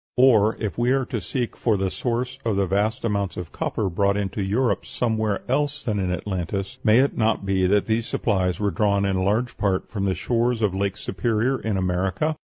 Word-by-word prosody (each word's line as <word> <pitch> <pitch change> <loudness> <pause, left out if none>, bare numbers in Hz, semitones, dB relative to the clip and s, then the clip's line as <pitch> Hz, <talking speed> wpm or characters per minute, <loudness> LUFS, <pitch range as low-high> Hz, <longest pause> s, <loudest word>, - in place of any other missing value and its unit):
Or, 115 -4 +5
if 105 +1 -3
we 120 +1 +2
are 135 -1 +1
to 115 -3 -4
seek 125 -3 -3
for 110 -4 +1
the 95 -1 -1
source 125 +2 -2
of 115 -3 0
the 100 0 +2
vast 105 +6 0
amount 100 -3 -1
of 90 -3 -6
copper 105 - -2
brought 100 +3 +1
into 100 0 -2
Europe 110 +6 +1
somewhere 110 -4 -1
else 145 +2 0
than 105 -5 -1
in 95 -2 -1
Atlantis, 95 +5 -3
may 110 0 +5
it 140 - 0
not 110 -3 +1
be 95 -1 +2
that 100 +2 +3
these 115 +1 0
supplies 95 -5 0
were 105 -1 +1
drawn 100 -2 +1
in 95 -1 0
large 110 +6 0
part 95 -2 0
from 100 -3 -2
the 95 -1 +1
shores 120 -1 0
of 100 -3 +2
Lake 100 +1 -1
Superior 115 +7 0
in 110 -3 -2
America? 95 - 0
105 Hz, 205 wpm, -24 LUFS, 95-120 Hz, -, Or